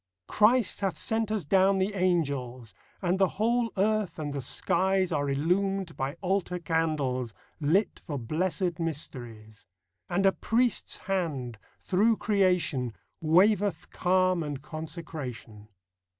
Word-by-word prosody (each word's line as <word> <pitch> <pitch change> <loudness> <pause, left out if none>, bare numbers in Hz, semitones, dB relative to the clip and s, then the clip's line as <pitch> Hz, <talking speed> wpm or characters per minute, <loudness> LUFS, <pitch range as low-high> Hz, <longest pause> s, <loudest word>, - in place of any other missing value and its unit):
Christ 220 +1 +3
hath 195 -2 -1
sent 225 -1 0
us 210 -7 -1
down 195 +3 +4
the 190 +2 0
angels; 140 - -1 0.3
And 180 +1 +1
the 190 - +5
whole 230 +2 +1
earth 215 0 +1
and 150 -3 -4
the 140 - -3
skies 190 +8 +1
Are 145 -2 0
illumed 180 +5 0
by 135 +3 -3
altar 185 -1 0
candles 150 -8 -1
TRUTH. - - -32
35 150 -1 0
Lit 200 +3 +2
for 145 - -5
blessed 175 - -1
mysteries; 120 - -5 0.4
And 195 +3 +1
a 195 - +6
Priest's 235 +4 0
Hand, 145 - -2 0.2
through 215 +4 +2
creation, 180 - +1 0.3
Waveth 195 +5 +3
calm 185 -1 +2
and 145 -3 -5
consecration. 150 - -7
175 Hz, 130 wpm, -28 LUFS, 145-195 Hz, 0.4 s, a